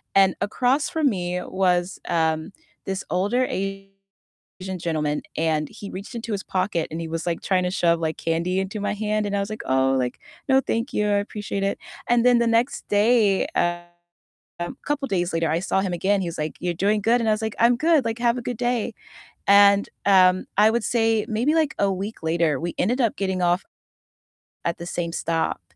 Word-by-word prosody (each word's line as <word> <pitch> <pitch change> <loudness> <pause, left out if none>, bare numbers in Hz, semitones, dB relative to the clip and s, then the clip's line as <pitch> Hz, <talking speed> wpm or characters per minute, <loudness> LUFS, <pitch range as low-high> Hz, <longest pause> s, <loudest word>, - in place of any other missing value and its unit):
and 195 -1 +5
across 255 - +1
from 320 -5 +2
me 180 -4 -2
was, 180 -1 0
um, 160 +1 0 0.3
this 190 0 -3
older 205 +8 +1
Asian 195 -1 -8
gentleman, 155 -3 -1 0.2
and 155 -2 0
he 200 - -9
reached 195 +6 -8
into 230 -1 -5
his 200 - -3
pocket, 185 -3 -1
and 160 +2 -4
he 165 - -4
was, 165 0 -4
like, 170 -1 -2
tryna 180 -1 0
shove, 170 -2 +2
like, 160 -1 -2
candy 170 +3 -1
into 190 +3 -3
my 205 - -1
hand, 210 0 -1
and 205 0 -2
I - - +1
was 200 - -4
like, 215 - -5
"Oh," 130 0 +2
like, 125 -1 -2 0.3
"no, 265 - +6
thank 230 +1 -2
you, 210 - +1
I 205 - +2
appreciate 205 -1 -4
it." 195 - 0 0.3
And 240 0 +3
then 245 -1 +5
the 235 - +2
next 230 +3 0
day, 210 -1 +3
um 175 0 0 1.0
couple 290 -1 -1
days 175 -5 -1
later, 165 -1 0
I 165 - +1
saw 190 +1 0
him 190 -2 -2
again, 195 +3 +1
he 180 - -2
was 170 - -5
like, 155 0 -3
"You're 175 -1 -1
doing 205 +5 +1
good?" 230 +4 +3
And 225 - +1
I - - +4
was 215 - -3
like, 220 -1 -3
"I'm 235 +1 +5
good," 315 -1 +3
like, 230 0 -2
"have 235 0 +2
a - - -6
good 240 0 -4
day." 240 -1 -1 0.5
And, 200 0 +6 0.2
um, 185 -2 +5
I 210 +2 +6
would 235 0 -1
say 225 -2 +2
maybe, 240 +8 +1
like, 315 -3 +1
a 200 -1 +2
week 195 +2 -5
later, 160 -3 +1
we 170 0 -3
ended 245 +8 +1
up 230 -4 +1
getting 190 -2 -1
off 175 +2 +2 1.0
at 170 - -1
the 170 - -6
same 175 -1 -3
stop, 165 0 -1
195 Hz, 205 wpm, -23 LUFS, 175-225 Hz, 1.0 s, no